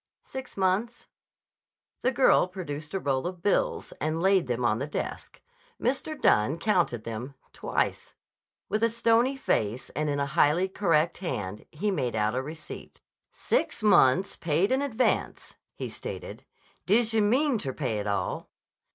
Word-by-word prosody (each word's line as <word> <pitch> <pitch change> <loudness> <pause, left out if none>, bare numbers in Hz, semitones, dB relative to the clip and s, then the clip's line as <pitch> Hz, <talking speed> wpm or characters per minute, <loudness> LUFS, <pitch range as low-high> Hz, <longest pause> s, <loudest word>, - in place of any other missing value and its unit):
"Six 265 -4 -8
months." 195 +5 0 0.9
The 255 - +2
girl 260 -7 +4
produced 155 -4 -6
a - - +1
roll 135 -1 0
of 180 -1 -7
bills 205 - 0
and 155 +2 -1
laid 190 -3 +3
them 120 0 -1
on 110 -1 +2
the 140 - -3
desk. 150 - -5 0.4
Mr. 275 +5 -1
Dunne 110 +9 +3
counted 170 - +1
them 115 +5 -6 0.2
twice. - - -2 0.5
With 215 - -1
a 230 - +4
stony 235 +3 +2
face 115 - -1
and 150 +2 -1
in 145 0 -1
a 140 - +1
highly 150 +5 +3
correct 170 -4 +1
hand 105 - -4
he 200 +7 -1
made 125 -10 -1
out 105 +1 +1
a 130 - 0
receipt. 155 +3 -9 0.3
"Six - - -1
months. 185 -2 +4
Paid 170 +6 +1
in 265 +1 +2
advance," 255 -3 0 0.2
he - - -4
stated. - - -7 0.4
"D'je 225 +2 +3
meanter 235 - +2
pay 125 -6 -2
it 105 - -4
all?" 100 -1 -2
170 Hz, 150 wpm, -27 LUFS, 135-215 Hz, 0.9 s, girl